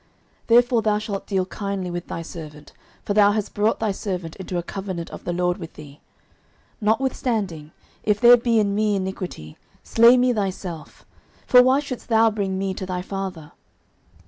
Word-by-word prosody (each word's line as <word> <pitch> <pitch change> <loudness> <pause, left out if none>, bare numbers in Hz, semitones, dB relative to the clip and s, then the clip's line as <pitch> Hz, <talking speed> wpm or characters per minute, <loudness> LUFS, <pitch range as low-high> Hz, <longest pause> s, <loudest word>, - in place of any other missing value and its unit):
09:020:008 - - -33
Therefore 240 0 +4
thou 215 -1 +1
shalt 210 -2 -5
deal 190 -2 0
kindly 195 -2 -4
with 175 0 -5
thy 165 - -5
servant; 150 -3 -10 0.3
for 205 - -2
thou 205 0 +5
hast 215 -2 -3
brought 210 +2 +1
thy 220 -2 0
servant 185 -4 -5
into 185 -2 -5
a 175 - -2
covenant 185 -2 -6
of - - -10
the - - -1
LORD 180 0 0
with 165 -2 -9
thee: 145 -1 -13 0.8
notwithstanding, 215 - -1 0.3
if 210 -1 +1
there 245 0 +8
be 235 -1 +1
in 205 -2 +2
me 210 0 +1
iniquity, 185 - -5 0.3
slay 235 +2 +6
me 250 0 +3
thyself; 190 -6 -5 0.4
for 250 - +7
why 260 +2 +4
shouldest 275 -5 -7
thou 225 0 +4
bring 195 -3 -2
me 190 0 -2
to 185 0 -6
thy 180 -1 -3
father? 185 -6 -6
195 Hz, 175 wpm, -23 LUFS, 180-220 Hz, 0.8 s, there